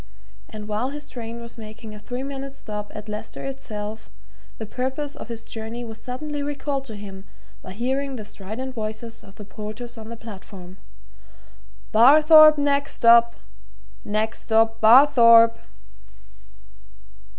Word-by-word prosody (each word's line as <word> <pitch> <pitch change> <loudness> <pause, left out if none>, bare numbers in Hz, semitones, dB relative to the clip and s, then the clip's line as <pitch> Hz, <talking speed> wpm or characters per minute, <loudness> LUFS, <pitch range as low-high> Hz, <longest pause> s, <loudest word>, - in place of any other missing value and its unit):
And 210 -1 -8
while 215 +5 -2
his 290 +1 -8
train 235 -1 -7
was 235 0 -10
making 215 0 -10
a 210 - -10
three 245 +5 -6
minutes' 275 0 -7
stop 210 -3 -7
at 210 +1 -8
Leicester 210 +1 -7
itself, 220 -5 -7 0.5
the 220 - -6
purpose 265 +6 -4
of - - -9
his 230 -1 -7
journey 225 +2 -7
was 225 -2 -9
suddenly 290 +4 -5
recalled 285 -1 -3
to 225 -5 -9
him 195 -2 -10 0.4
by 185 - -9
hearing 265 +5 -2
the 215 -4 -7
strident 220 +7 -7
voices 225 0 -6
of 195 - -16
the 210 - -11
porters 215 +4 -8
on 220 0 -10
the 235 - -8
platform. 195 -4 -11 1.1
"Barthorpe 305 +6 +7
next 280 -1 0
stop! 235 0 +5 0.7
next 215 +2 -2
stop 225 0 +1
Barthorpe!" 230 -1 +7
230 Hz, 140 wpm, -23 LUFS, 215-270 Hz, 1.1 s, Barthorpe